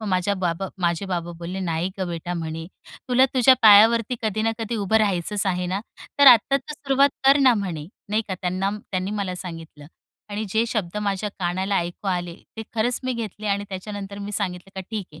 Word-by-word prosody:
मग 215 - -6
माझ्या 185 +1 +1
बाबा 185 0 -2
माझे 175 +1 0
बाबा 175 -2 -3
बोलले, 175 +3 -5
"नाही 170 0 -1
गं 185 - -2
बेटा," 175 +1 -4
म्हणे, 165 -1 -5 0.4
"तुला 255 +1 +5
तुझ्या 260 0 +6
पायावरती 225 +3 +7
कधी 215 0 -1
ना 225 - +1
कधी 225 +1 -3
उभं 210 +1 +1
राहायचंच 200 0 0
आहे 180 -1 0
ना? 190 +3 -2 0.4
तर 285 - +6
आता 255 +2 +7
तर 280 +3 -7
सुरुवात 280 -1 +2 0.2
कर 275 +1 +7
ना." 255 -3 +6
म्हणे, 175 -7 -4 0.2
नाही 215 +2 +1
का, 190 - -2
त्यांना 185 +2 -1 0.2
त्यांनी 185 0 -2
मला 200 -3 -2
सांगितलं. 165 -5 -9 0.4
आणि 210 +2 -3
जे 220 +4 +1
शब्द 210 -5 -3
माझ्या 200 0 -1
कानाला 190 +2 -1
ऐकू 175 +3 -3
आले 175 -2 -2 0.2
ते 220 - -4
खरंच 235 +2 0
मी 255 - 0
घेतले 215 -2 -5
आणि 200 0 0
त्याच्यानंतर 200 +1 -6
मी 205 +1 -6
सांगितलं 190 -2 -3
का 190 - -4
"ठीक 210 -4 -4
आहे, 155 - -13
200 Hz, 200 wpm, -23 LUFS, 180-220 Hz, 0.4 s, पायावरती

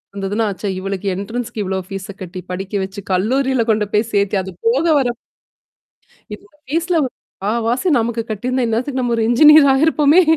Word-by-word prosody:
வந்ததுன்னா, 200 +3 -1
ச்சா 205 - -3
இவளுக்கு 195 +1 -4
என்ட்ரன்ஸ்க்கு 225 +3 -4
இவ்வளோ 190 0 -2
ஃபீஸா 195 0 -7
கட்டி 185 0 -7
படிக்க 195 +2 -6
வச்சு, 190 +2 -7
கல்லூரியில 255 +7 +1
கொண்டு 215 -1 +2
போய் 215 +2 +1
சேத்தி 200 0 +1
அது 190 - -7 0.2
போக 265 +8 +2
வர 260 - +1 1.3
இதோட 400 -5 -16
ஃபீஸ்ல 335 +5 0
ஒரு 255 - -4
முக்காவாசி 230 - -2
நமக்கு 230 0 -2
கட்டியிருந்தா, 250 +4 -1
இந்நேரத்துக்கு 255 +4 -1
நம்ம 240 -1 0
ஒரு 225 - +1
இன்ஜினியர் 300 +3 +7
ஆயிருப்போமே! 305 +3 +4
230 Hz, 155 wpm, -18 LUFS, 200-265 Hz, 1.3 s, இன்ஜினியர்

